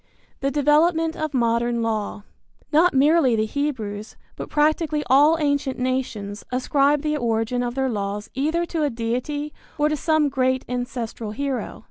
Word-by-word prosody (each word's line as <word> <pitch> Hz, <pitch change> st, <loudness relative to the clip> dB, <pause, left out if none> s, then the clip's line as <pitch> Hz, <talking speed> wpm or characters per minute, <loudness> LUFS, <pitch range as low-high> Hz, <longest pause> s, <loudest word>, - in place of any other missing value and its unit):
V. -, -, -37 dB
THE 275 Hz, -, 0 dB
DEVELOPMENT 320 Hz, +2 st, +3 dB
OF 310 Hz, -1 st, -3 dB
MODERN 235 Hz, -1 st, +1 dB
LAW. 215 Hz, -2 st, -2 dB, 0.5 s
Not 330 Hz, +1 st, +4 dB
merely 280 Hz, -2 st, +4 dB
the 215 Hz, 0 st, +1 dB
Hebrews, 220 Hz, -6 st, -4 dB, 0.2 s
but -, -, -7 dB
practically 305 Hz, 0 st, +1 dB
all 295 Hz, +5 st, +6 dB
ancient 285 Hz, -3 st, 0 dB
nations 240 Hz, -5 st, -3 dB
ascribe 280 Hz, +3 st, +2 dB
the 300 Hz, 0 st, 0 dB
origin 230 Hz, 0 st, 0 dB
of 240 Hz, 0 st, -3 dB
their 265 Hz, 0 st, 0 dB
laws 205 Hz, -2 st, -3 dB
either 315 Hz, +6 st, 0 dB
to 335 Hz, -2 st, -3 dB
a 295 Hz, -, +2 dB
deity 255 Hz, +6 st, -3 dB, 0.2 s
or 300 Hz, 0 st, +2 dB
to 305 Hz, -, 0 dB
some 315 Hz, 0 st, +2 dB
great 260 Hz, -1 st, 0 dB
ancestral 240 Hz, -3 st, -4 dB
hero. 275 Hz, +1 st, -3 dB
265 Hz, 155 wpm, -23 LUFS, 235-300 Hz, 0.5 s, all